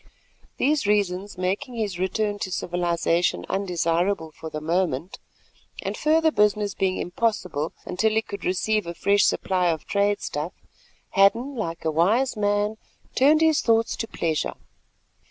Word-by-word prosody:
These 285 Hz, -4 st, +1 dB
reasons 200 Hz, -2 st, 0 dB
making 200 Hz, +8 st, -2 dB
his 205 Hz, -6 st, -3 dB
return 205 Hz, +2 st, -1 dB
to 185 Hz, -, -4 dB
civilisation 175 Hz, -1 st, 0 dB
undesirable 175 Hz, -2 st, 0 dB
for 160 Hz, -, -8 dB
the 155 Hz, -, -5 dB
moment, 165 Hz, 0 st, -1 dB, 0.6 s
and -, -, -3 dB
further 315 Hz, +1 st, +3 dB
business 210 Hz, -3 st, +2 dB
being 190 Hz, -1 st, 0 dB
impossible 180 Hz, -6 st, -1 dB
until 220 Hz, +5 st, +1 dB
he 220 Hz, +1 st, +2 dB
could 200 Hz, -2 st, -8 dB
receive 210 Hz, +2 st, 0 dB
a 170 Hz, -, -5 dB
fresh 200 Hz, +3 st, +3 dB
supply 185 Hz, -2 st, +1 dB
of 160 Hz, -2 st, -1 dB
trade 205 Hz, 0 st, +1 dB
stuff, 150 Hz, +5 st, -4 dB, 0.6 s
Hadden 230 Hz, +8 st, +3 dB
like 170 Hz, -10 st, -4 dB
a 160 Hz, -, +2 dB
wise 215 Hz, -, +2 dB
man 205 Hz, +1 st, 0 dB, 0.4 s
turned 300 Hz, +4 st, +4 dB
his 320 Hz, -2 st, +4 dB
thoughts 225 Hz, -1 st, +2 dB
to 225 Hz, -, -3 dB
pleasure. 160 Hz, -7 st, -2 dB
200 Hz, 140 wpm, -24 LUFS, 175-220 Hz, 0.6 s, turned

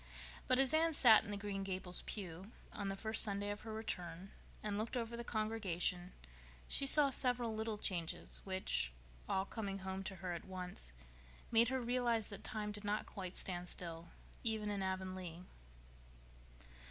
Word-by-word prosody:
But 255 Hz, -, +5 dB
as 270 Hz, +1 st, +4 dB
Anne 325 Hz, 0 st, +4 dB
sat 225 Hz, -6 st, +8 dB
in -, -, -8 dB
the 205 Hz, -, -2 dB
Green 200 Hz, -1 st, -3 dB
Gables 185 Hz, -2 st, -4 dB
pew, 190 Hz, 0 st, -5 dB, 0.2 s
on 200 Hz, -, -3 dB
the 195 Hz, -, -1 dB
first 220 Hz, +2 st, +3 dB
Sunday 205 Hz, -1 st, +1 dB
after 205 Hz, +2 st, -6 dB
her -, -, -4 dB
return, 185 Hz, -4 st, -4 dB, 0.3 s
and 210 Hz, -1 st, -1 dB
looked 220 Hz, +4 st, -1 dB
over 235 Hz, -1 st, -2 dB
the 235 Hz, -, -4 dB
congregation, 200 Hz, -6 st, -1 dB, 0.5 s
she 275 Hz, -, +1 dB
saw 285 Hz, 0 st, +9 dB
several 245 Hz, -3 st, +3 dB
little 220 Hz, 0 st, -2 dB
changes 175 Hz, -5 st, 0 dB
which, 125 Hz, -, 0 dB, 0.4 s
all 190 Hz, 0 st, +1 dB
coming 200 Hz, -2 st, -3 dB
home 190 Hz, 0 st, -2 dB
to 195 Hz, -, -3 dB
her 180 Hz, -1 st, -4 dB
at 170 Hz, -, -5 dB
once, 180 Hz, -, -5 dB, 0.6 s
made 230 Hz, +1 st, +6 dB
her 260 Hz, +2 st, 0 dB
realize 240 Hz, -2 st, +1 dB
that 200 Hz, -2 st, -8 dB
time 215 Hz, -3 st, -3 dB
did 205 Hz, 0 st, -6 dB
not 205 Hz, +1 st, 0 dB
quite 185 Hz, -3 st, -6 dB
stand 180 Hz, -1 st, -4 dB
still, 170 Hz, -1 st, -6 dB, 0.3 s
even 220 Hz, -3 st, 0 dB
in 200 Hz, -1 st, -1 dB
Avonlea. 185 Hz, -2 st, -3 dB
205 Hz, 165 wpm, -38 LUFS, 185-225 Hz, 0.6 s, saw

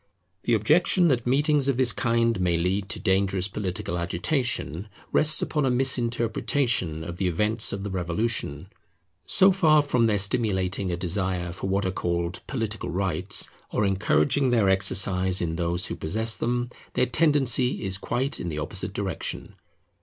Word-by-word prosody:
The 120 Hz, -, +3 dB
objection 165 Hz, -, +3 dB
that 125 Hz, -3 st, 0 dB
meetings 145 Hz, +2 st, +2 dB
of 135 Hz, -3 st, +1 dB
this 130 Hz, -2 st, +3 dB
kind 115 Hz, -3 st, +1 dB
may 85 Hz, -2 st, +1 dB
lead 95 Hz, +3 st, -1 dB
to -, -, -3 dB
dangerous 95 Hz, 0 st, +1 dB
political 95 Hz, -3 st, -4 dB
agitation, 90 Hz, -, -2 dB, 0.2 s
rests 155 Hz, 0 st, +3 dB
upon 150 Hz, -2 st, -1 dB
a 135 Hz, -, +2 dB
misinterpretation 120 Hz, -, 0 dB
of 85 Hz, +1 st, -7 dB
the 95 Hz, -, 0 dB
events 105 Hz, +6 st, 0 dB
of 100 Hz, 0 st, -4 dB
the 100 Hz, -, -4 dB
Revolution. 90 Hz, -3 st, -2 dB, 0.6 s
So 190 Hz, +1 st, +5 dB
far 155 Hz, -5 st, +4 dB
from 125 Hz, -5 st, +2 dB
their 105 Hz, -2 st, +1 dB
stimulating 100 Hz, -2 st, 0 dB
a 85 Hz, -, -2 dB
desire 90 Hz, -1 st, -2 dB
for 95 Hz, -, -5 dB
what 100 Hz, +1 st, 0 dB
are 95 Hz, -, 0 dB
called 85 Hz, -1 st, -2 dB
political 115 Hz, -4 st, -3 dB
rights, 95 Hz, +1 st, 0 dB, 0.2 s
or 105 Hz, -, 0 dB
encouraging 95 Hz, -, +1 dB
their 115 Hz, -5 st, +3 dB
exercise 95 Hz, -1 st, +2 dB
in 80 Hz, -2 st, -2 dB
those 85 Hz, +1 st, -1 dB
who -, -, -4 dB
possess 110 Hz, +8 st, 0 dB
them, 120 Hz, +1 st, -2 dB, 0.2 s
their 125 Hz, -, +3 dB
tendency 135 Hz, -3 st, +2 dB
is 95 Hz, 0 st, -3 dB
quite 130 Hz, +7 st, -2 dB
in 85 Hz, -, -4 dB
the 75 Hz, -, -5 dB
opposite 75 Hz, -, -3 dB
direction. -, -, -4 dB
100 Hz, 160 wpm, -25 LUFS, 90-125 Hz, 0.6 s, So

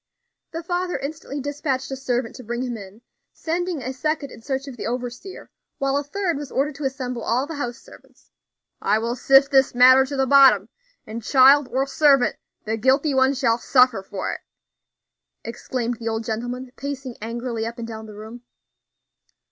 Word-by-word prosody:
The 330 Hz, +1 st, -5 dB
father 355 Hz, +1 st, -2 dB
instantly 285 Hz, 0 st, -6 dB
despatched 280 Hz, -2 st, -3 dB
a -, -, -2 dB
servant 250 Hz, -3 st, -2 dB
to 255 Hz, -, -10 dB
bring 240 Hz, +2 st, -3 dB
him 245 Hz, -2 st, -3 dB
in; 205 Hz, +2 st, -11 dB, 0.3 s
sending 340 Hz, -3 st, -3 dB
a 260 Hz, -, -4 dB
second 290 Hz, +1 st, -2 dB
in -, -, -12 dB
search 270 Hz, +2 st, -3 dB
of 270 Hz, -, -8 dB
the 220 Hz, -, -5 dB
overseer; 245 Hz, +9 st, -6 dB, 0.3 s
while 275 Hz, 0 st, 0 dB
a 285 Hz, -, 0 dB
third 345 Hz, +2 st, -2 dB
was 290 Hz, -1 st, -7 dB
ordered 290 Hz, +3 st, 0 dB
to 295 Hz, -, -5 dB
assemble 255 Hz, -2 st, -3 dB
all 250 Hz, +4 st, 0 dB
the 325 Hz, -, -7 dB
house 245 Hz, -3 st, -4 dB
servants. -, -, -19 dB, 0.5 s
"I 210 Hz, +2 st, +2 dB
will 230 Hz, +2 st, -2 dB
sift 270 Hz, +2 st, +5 dB
this 270 Hz, -2 st, +3 dB
matter 255 Hz, +2 st, +7 dB
to 280 Hz, 0 st, -5 dB
the 265 Hz, -, +2 dB
bottom, 260 Hz, -7 st, +6 dB, 0.4 s
and 225 Hz, +2 st, -6 dB
child 270 Hz, +3 st, +6 dB
or 265 Hz, +1 st, 0 dB
servant, 275 Hz, -2 st, +3 dB, 0.3 s
the 220 Hz, +1 st, -1 dB
guilty 270 Hz, +5 st, +2 dB
one 265 Hz, +1 st, +3 dB
shall 240 Hz, -3 st, +1 dB
suffer 250 Hz, -5 st, +3 dB
for 190 Hz, 0 st, -4 dB
it," -, -, -8 dB, 1.0 s
exclaimed 240 Hz, 0 st, -4 dB
the 230 Hz, -, -6 dB
old 225 Hz, 0 st, -2 dB
gentleman, 245 Hz, +3 st, -4 dB
pacing 275 Hz, -3 st, -6 dB
angrily 230 Hz, 0 st, -4 dB
up 230 Hz, +1 st, -7 dB
and 235 Hz, -1 st, -6 dB
down 220 Hz, -1 st, -8 dB
the 210 Hz, -, -11 dB
room. 220 Hz, +3 st, -10 dB
260 Hz, 180 wpm, -23 LUFS, 235-280 Hz, 1.0 s, matter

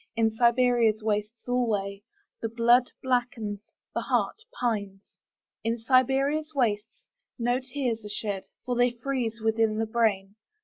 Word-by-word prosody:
In 225 Hz, -1 st, +3 dB
Siberia's 235 Hz, -1 st, +3 dB
wastes 210 Hz, +1 st, -2 dB
alwayThe 225 Hz, -1 st, -3 dB
blood 240 Hz, +2 st, +5 dB
blackens, 245 Hz, -5 st, -1 dB, 0.3 s
the -, -, -1 dB
heart -, -, 0 dB, 0.2 s
pines.In 215 Hz, +1 st, -4 dB
Siberia's 270 Hz, +6 st, +2 dB
wastesNo 245 Hz, -, -2 dB
tears 255 Hz, -4 st, -3 dB
are 210 Hz, -, -7 dB
shed, 205 Hz, -2 st, -3 dB, 0.2 s
For 250 Hz, 0 st, -1 dB
they 245 Hz, +1 st, +4 dB
freeze 240 Hz, -5 st, -2 dB
within 220 Hz, -1 st, +2 dB
the 225 Hz, -, +1 dB
brain. 215 Hz, -3 st, 0 dB
230 Hz, 115 wpm, -27 LUFS, 215-250 Hz, 0.3 s, blood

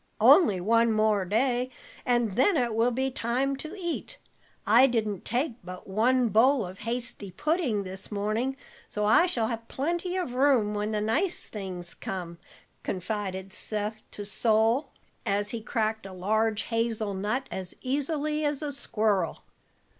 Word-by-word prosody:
"Only 210 Hz, -, +6 dB
one 230 Hz, +4 st, +3 dB
more 215 Hz, -2 st, +2 dB
day 245 Hz, +5 st, +1 dB, 0.4 s
and 240 Hz, -3 st, +2 dB
then 285 Hz, -, +3 dB
it 240 Hz, -4 st, +1 dB
will 225 Hz, +2 st, +3 dB
be 265 Hz, +2 st, -1 dB
time 260 Hz, +2 st, 0 dB
to 310 Hz, +6 st, -7 dB
eat. 345 Hz, +7 st, -4 dB, 0.5 s
I 235 Hz, +6 st, +7 dB
didn't 215 Hz, -6 st, -1 dB
take 245 Hz, +1 st, -1 dB
but 180 Hz, +1 st, -9 dB
one 235 Hz, +5 st, +2 dB
bowl 235 Hz, +3 st, +4 dB
of 185 Hz, +1 st, -9 dB
hasty 235 Hz, -3 st, -3 dB
pudding 260 Hz, -, 0 dB
this 190 Hz, +2 st, -7 dB
morning, 215 Hz, +6 st, -1 dB, 0.3 s
so 210 Hz, 0 st, -1 dB
I 220 Hz, +12 st, +5 dB
shall 235 Hz, -10 st, 0 dB
have 230 Hz, -1 st, -5 dB
plenty 345 Hz, +8 st, -2 dB
of 350 Hz, -10 st, -2 dB
room 250 Hz, -6 st, +3 dB
when 210 Hz, +1 st, -1 dB
the 210 Hz, -1 st, 0 dB
nice 305 Hz, -, 0 dB
things 185 Hz, -4 st, -7 dB
come," 175 Hz, -3 st, -6 dB, 0.4 s
confided 190 Hz, 0 st, -3 dB
Seth 215 Hz, +1 st, -2 dB
to 205 Hz, -, -7 dB
Sol, 225 Hz, +6 st, +2 dB, 0.3 s
as 205 Hz, +1 st, +1 dB
he 230 Hz, -, -4 dB
cracked 220 Hz, -1 st, -1 dB
a 190 Hz, -, -9 dB
large 215 Hz, +4 st, 0 dB
hazel 225 Hz, -3 st, -1 dB
nut 215 Hz, +8 st, -2 dB
as 185 Hz, -2 st, -3 dB
easily 295 Hz, +3 st, -1 dB
as 290 Hz, 0 st, 0 dB
a 295 Hz, -, -2 dB
squirrel. 215 Hz, -7 st, 0 dB
225 Hz, 155 wpm, -28 LUFS, 205-260 Hz, 0.5 s, I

